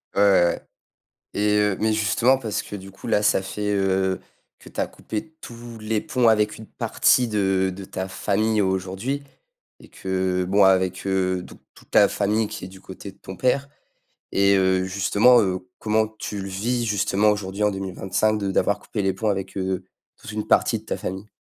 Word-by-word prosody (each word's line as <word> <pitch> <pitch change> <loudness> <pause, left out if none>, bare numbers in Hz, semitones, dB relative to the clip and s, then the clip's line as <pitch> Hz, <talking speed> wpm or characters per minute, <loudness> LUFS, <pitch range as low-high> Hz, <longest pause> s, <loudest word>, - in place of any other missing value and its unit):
Ouais, - - +3
ouais, 100 -3 +6
ouais. 85 - -1 0.7
Et 105 0 +2
heu, 105 -2 +1
mais 110 0 +2
justement 115 +4 +3
parce 110 -6 -3
que, - - -8
du 95 0 -9
coup, 95 - -11
là, 105 - +2
ça 105 - +3
fait, 105 +2 -4
heu, 95 -1 +1 0.4
que - - -14
tu - - -8
as - - +1
coupé 110 +9 -6
tous 120 0 -10
les 110 0 -1
ponts 125 -3 +1
avec 105 -1 +3
une 110 - -10
partie 125 - +2
d, 95 -3 +1
de 95 +1 -8
ta 95 0 -5
famille 105 +3 0
aujourd'hui, 95 +9 -2 0.6
et - - -16
que 95 -1 -1
heu, - - -4
bon 100 +2 +4
avec 95 -1 +3
heu, 95 -1 0
toute - - -14 0.2
toute - - -20
ta 100 - +6
famille 105 +2 0
qui 90 - -7
est - - -7
du 95 0 -14
côté 95 +1 -9
de 95 - -25
ton 95 -1 -9
père 135 +2 +1 0.6
et 100 0 +4
heu, 95 -1 +2
justement 100 +6 +4
heu, 95 -2 -2
comment 110 0 +2
tu 105 -2 -4
le 95 - -5
vis 115 +6 -1
justement 105 0 +2
aujourd'hui 105 0 -2
en 105 - +3
2025, 95 +2 -1
de 100 -2 -2
d'avoir 100 +2 +2
coupé 105 - -4
les 95 -1 +1
ponts 110 +3 -2
avec 95 -1 -3
heu, 95 -1 -2 0.3
toute - - -10
une 105 0 -3
partie - - +3
de - - -23
ta - - -2
famille? 95 +3 -6
100 Hz, 200 wpm, -23 LUFS, 95-110 Hz, 0.7 s, ouais